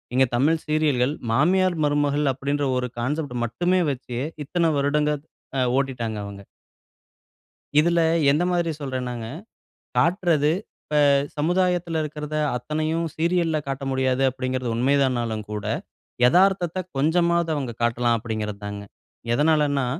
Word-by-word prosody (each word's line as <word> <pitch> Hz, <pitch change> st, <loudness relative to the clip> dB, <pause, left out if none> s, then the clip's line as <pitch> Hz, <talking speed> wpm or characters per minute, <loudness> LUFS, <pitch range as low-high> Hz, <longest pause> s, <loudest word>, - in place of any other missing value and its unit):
இங்க 130 Hz, 0 st, +5 dB
தமிழ் 155 Hz, +6 st, +2 dB
சீரியல்கள், 150 Hz, -3 st, +1 dB, 0.2 s
மாமியார், 180 Hz, +7 st, +3 dB
மருமகள் 145 Hz, -1 st, +1 dB
அப்படீன்ற 140 Hz, +2 st, -1 dB
ஒரு 125 Hz, -1 st, -2 dB
கான்செப்ட் 140 Hz, +1 st, -2 dB
மட்டுமே 180 Hz, +9 st, +1 dB
வச்சு, 125 Hz, -2 st, -6 dB, 0.3 s
இத்தன 170 Hz, +2 st, +1 dB
வருடங்க 150 Hz, +2 st, +1 dB
த், -, -, -35 dB, 0.3 s
அ, -, -, +2 dB, 0.2 s
ஓட்டிட்டாங்க 120 Hz, -5 st, -2 dB
அவங்க. 100 Hz, -1 st, -9 dB, 1.4 s
இதுல 170 Hz, +2 st, +2 dB, 0.3 s
எந்த 150 Hz, +5 st, +2 dB
மாதிரி 170 Hz, -2 st, +1 dB
சொல்றேன்னாங்க, 125 Hz, -4 st, -4 dB, 0.7 s
காட்றது 165 Hz, -4 st, +3 dB
இப்ப -, -, -41 dB, 0.7 s
சமுதாயத்துல 175 Hz, +1 st, +1 dB
இருக்கிறத 150 Hz, 0 st, -5 dB, 0.2 s
அத்தனையும் 155 Hz, +6 st, -1 dB
சீரியல்ல 170 Hz, -1 st, +1 dB
காட்ட 135 Hz, 0 st, -3 dB
முடியாது, 130 Hz, 0 st, +1 dB
அப்படிங்கிறது 130 Hz, -1 st, -3 dB
உண்மைதானாலும் 120 Hz, -4 st, +1 dB
கூட, 105 Hz, -1 st, -4 dB, 0.6 s
எதார்த்தத்த 185 Hz, +1 st, +3 dB, 0.2 s
கொஞ்சமாவது 170 Hz, +3 st, +2 dB
அவங்க 135 Hz, -5 st, -3 dB
காட்டலாம் 120 Hz, 0 st, +2 dB
அப்படிங்கிறதுதாங்க. 105 Hz, -2 st, -5 dB, 0.5 s
எதனாலன்னா, 145 Hz, -2 st, +2 dB
145 Hz, 110 wpm, -24 LUFS, 125-165 Hz, 1.4 s, இங்க